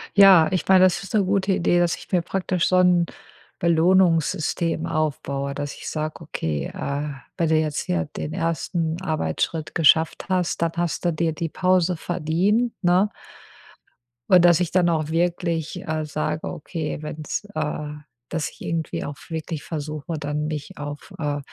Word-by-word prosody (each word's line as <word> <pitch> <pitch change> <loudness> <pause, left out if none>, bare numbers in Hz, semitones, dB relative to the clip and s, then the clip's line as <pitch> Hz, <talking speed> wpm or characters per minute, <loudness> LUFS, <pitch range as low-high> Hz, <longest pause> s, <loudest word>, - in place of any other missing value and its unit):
Ja, 195 -5 +8
ich 185 - -1
meine, 190 -1 +6
das 185 -2 +3
ist 195 - -5
'ne 205 - +4
gute 195 0 +1
Idee, 175 -1 +2
dass 175 -1 +2
ich - - -14
mir 180 -2 +3
praktisch 180 0 -1
so 185 - +2
'n 180 -2 +4 0.5
Belohnungssystem 170 -1 +2
aufbaue, 140 -4 -2
dass 145 0 -4
ich - - -7
sage: 155 +1 -4
„Okay, 80 - -3
äh, 145 +2 -3 0.3
wenn 165 -3 +1
du 160 - +4
jetzt 155 -2 -1
hier 85 -2 0
den 75 0 -4
1. 165 0 -1
Arbeitsschritt 155 - -2
geschafft 160 0 +3
hast, 180 -3 0
dann 165 -1 +2
hast 170 -4 -1
du 175 - +3
dir 160 0 0
die 165 +1 -3
Pause 180 0 +2
verdient.”, 185 +9 0
ne? 180 +3 +4 1.2
Und 180 -2 +7
dass 175 -1 +6
ich 175 -2 -1
dann 175 -1 +3
auch 155 -2 0
wirklich, 170 0 -1
äh, 155 -2 -2
sage: 155 +1 -2
„Okay, 155 0 -4
wenn's” 155 +5 -4
äh, 150 -1 -2 0.4
dass 165 -2 -2
ich - - -20
irgendwie 165 -1 -3
auch 145 - -5
wirklich 160 -2 -4
versuche, 150 0 -5
dann 150 0 -2
mich 150 -2 -5
auf, 145 0 -7
äh, 145 -2 -1
165 Hz, 165 wpm, -23 LUFS, 155-180 Hz, 1.2 s, Ja